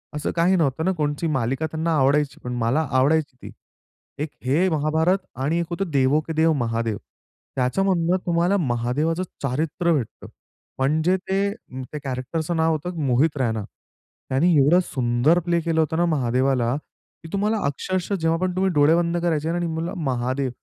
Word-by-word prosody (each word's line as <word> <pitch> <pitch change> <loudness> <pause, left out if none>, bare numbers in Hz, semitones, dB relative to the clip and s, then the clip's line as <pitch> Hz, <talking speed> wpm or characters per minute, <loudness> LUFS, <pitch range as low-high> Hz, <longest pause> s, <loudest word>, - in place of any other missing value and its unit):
असं 150 - -2
काही 175 +3 +3
नव्हतं 160 -2 0
ना, 190 - +3
कोणची 150 +2 -1
मालिका 135 0 -1
त्यांना 160 0 0
आवडायची. 140 +2 +2
पण 125 0 -4
मला 120 +7 +1 0.2
आवडायची 145 +1 +2
ती. - - -9 0.7
एक 155 - -4 0.2
हे 160 +9 +2
महाभारत 160 +4 +2 0.3
आणि 160 +5 +1
एक 170 - -1
होतं, 175 +1 -3
देवो 140 +1 +3
के 160 - -3
देव 160 0 +3
महादेव. 115 -2 -1 0.6
त्याच्यामधून 170 +6 +1
तुम्हाला 175 +3 +2
महादेवाचं 145 +4 0 0.2
चारित्र्य 155 +6 0
भेटतं. 130 -8 -4 0.5
म्हणजे 155 +7 +2
ते 190 +1 -1
उम्म, 130 - -8
त्या 150 - -5
कॅरेक्टरचं 140 +6 -3
नाव 160 0 +3
होतं 165 +3 -3
मोहित 140 +4 +2
रैना. 110 -4 -1 0.7
त्याने 150 +7 +3
एवढं 155 +6 +5
सुंदर 125 +5 +2
प्ले 170 -1 +2
केलं 165 -1 +1
होत 160 -1 +1
ना. 175 - +3
महादेवाला, 130 -4 +1 0.5
की 165 - -9
तुम्हाला 210 +3 +1
अक्षरशः 185 +7 -2
जेव्हा 165 0 +2
पण 185 0 -1
तुम्ही 190 0 +1
डोळे 150 +2 +5
बंद 170 0 +1
करायचे 160 -2 0
आणि 175 0 -1
म्हणलं, 165 +1 -3
"महादेव" 130 0 -1
155 Hz, 165 wpm, -23 LUFS, 130-170 Hz, 0.7 s, एवढं